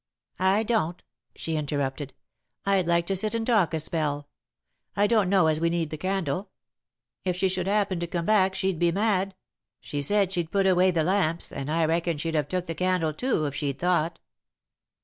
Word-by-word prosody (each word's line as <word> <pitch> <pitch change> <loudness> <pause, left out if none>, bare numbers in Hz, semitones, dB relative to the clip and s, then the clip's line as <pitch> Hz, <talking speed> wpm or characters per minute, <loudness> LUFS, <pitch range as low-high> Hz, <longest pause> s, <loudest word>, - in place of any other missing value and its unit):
"I 190 +3 +3
don't," 210 -7 -1 0.3
she 160 - -3
interrupted. 145 -2 -3 0.5
"I'd 195 -3 +2
like 170 0 +2
to 195 - -1
sit 215 +4 +1
and 225 -1 -1
talk 215 -8 +3
a - - -1
spell. 150 -2 -2 0.7
I 205 - +3
don't 210 -3 +3
know 190 -3 +4
as 155 -1 +2
we 170 +1 +2
need 165 -2 -1
the - - -3
candle. 190 +1 -2 0.7
If 180 -2 0
she 190 +1 +1
should 185 0 -2
happen 200 -3 +1
to 170 - -3
come 170 0 -3
back, 195 -2 +3
she'd 190 -3 -1
be 175 -1 +3
mad. 195 0 0 0.4
She 145 - -4
said 195 +5 +2
she'd 170 -3 -1
put 195 +1 +1
away 185 0 +4
the 170 -3 +1
lamps, 175 -2 0
and 140 +2 -4
I 165 0 +2
reckon 165 0 0
she'd 165 +2 -3
have 150 -3 0
took 180 +2 -2
the 165 - -4
candle, 180 -2 0
too, 235 - 0
if 140 - -3
she'd 140 -1 -2
thought." 175 -2 +1
175 Hz, 195 wpm, -26 LUFS, 160-195 Hz, 0.7 s, know